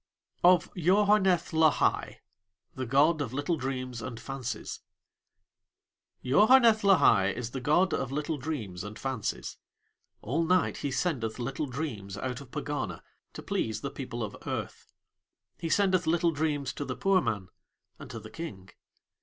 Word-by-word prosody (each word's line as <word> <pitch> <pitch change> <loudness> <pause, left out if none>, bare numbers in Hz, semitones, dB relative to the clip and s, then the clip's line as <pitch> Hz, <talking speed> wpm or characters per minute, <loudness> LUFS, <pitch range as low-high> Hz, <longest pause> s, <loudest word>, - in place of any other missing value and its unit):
OF 180 -1 +5
YOHARNETH 190 0 +3
LAHAI 160 -1 +2 0.5
(The 130 -1 -4
God 145 +5 +3
of 130 -4 -3
Little 145 +5 0
Dreams 130 -4 -4
and 115 +1 -6
Fancies) 130 +1 -5 1.5
Yaoharneth 220 - +6
Lahai 180 - +5
is 120 0 -5
the 130 - -5
god 160 +6 +3
of 130 - -2
little 150 +1 -2
dreams 110 - -4
and 105 +1 -8
fancies. 130 -5 -4 0.7
All 145 +10 0
night 180 +2 +2
he 145 - -3
sendeth 130 -7 -1
little 135 +5 -3
dreams 115 -8 -5
out 125 +3 -4
of 135 - -13
Pegana 145 +1 -4 0.3
to - - -8
please 110 -1 -2
the 140 - -4
people 120 -4 -5
of 105 - -5
Earth. - - -5 0.7
He 165 - -3
sendeth 185 -1 +2
little 170 +1 +3
dreams 145 -3 -1
to - - -4
the - - -4
poor 195 -1 +3
man 105 - -3 0.5
and - - -10
to - - -6
The - - -12
King. 100 - -8
145 Hz, 145 wpm, -29 LUFS, 120-170 Hz, 1.5 s, Yaoharneth